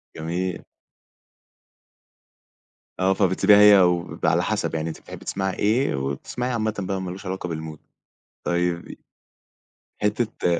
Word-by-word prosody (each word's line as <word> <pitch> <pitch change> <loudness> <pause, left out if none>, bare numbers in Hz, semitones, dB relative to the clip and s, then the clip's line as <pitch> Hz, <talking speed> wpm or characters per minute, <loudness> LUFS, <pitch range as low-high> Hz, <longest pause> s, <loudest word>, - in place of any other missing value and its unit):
جميل. 90 +3 -3 2.4
آه 95 +1 +3
فبتسيبيها 95 +1 +4
هي 105 -1 +8
وبيبقى 90 -1 +1
على - - +2
حسب - - -1
يعني 80 +1 -2
أنتِ 80 - -7
بتحبي - - -11
تسمعي 95 -1 -2
إيه، 115 - +1
وبتسمعيه 70 - -3
عامةً 110 -3 -1
بقى 95 0 -2
ما 90 -1 -4
لوش 95 +3 -9
علاقة 95 -1 -4
بالmood 80 -1 -6 0.7
طيّب 85 0 -1
ي - - -9 1.0
حتّة 105 -5 0
95 Hz, 125 wpm, -24 LUFS, 85-105 Hz, 2.4 s, هي